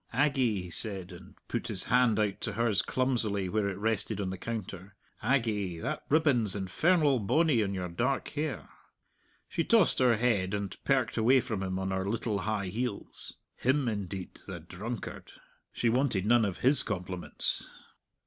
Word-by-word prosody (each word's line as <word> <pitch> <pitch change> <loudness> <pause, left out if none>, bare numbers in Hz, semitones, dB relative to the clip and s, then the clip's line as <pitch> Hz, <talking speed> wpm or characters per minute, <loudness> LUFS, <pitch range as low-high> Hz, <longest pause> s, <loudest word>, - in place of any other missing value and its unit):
"Aggie," 130 -7 +2
he 90 - -8
said, 95 -4 0
and 90 - -12
put - - -3
his - - 0
hand 125 -2 +3
out 105 -2 0
to - - -2
hers 110 -3 +2
clumsily 115 -7 0
where 105 +1 0
it 95 - -5
rested 110 0 0
on 95 -2 -2
the 95 - -5
counter 100 -4 -6 0.3
"Aggie, 105 -9 0
that 80 - -3
ribbon's 135 -10 +3
infernal 140 - +2
bonny 145 +4 +3
on 100 -2 -1
your 90 -1 -3
dark 120 +10 -1
hair!" 150 -4 -3 0.8
She 165 - -1
tossed 220 -3 +4
her 125 -3 +4
head, 105 -5 +1
and 100 -1 -4
perked 130 -4 +1
away 125 +4 +5
from 110 -5 -3
him 95 -1 -2
on 95 0 -2
her 95 +1 -1
little 110 -1 -1
high 100 -2 -2
heels. 115 +1 -3 0.2
Him, 130 +1 +1
indeed! 100 -4 -4
the 95 -3 -6
drunkard! 100 +7 -7 0.4
She 120 - -1
wanted 115 -5 +1
none 120 0 +4
of 95 -3 -3
his 135 0 +6
compliments! 90 -3 -2
110 Hz, 165 wpm, -30 LUFS, 95-125 Hz, 0.8 s, his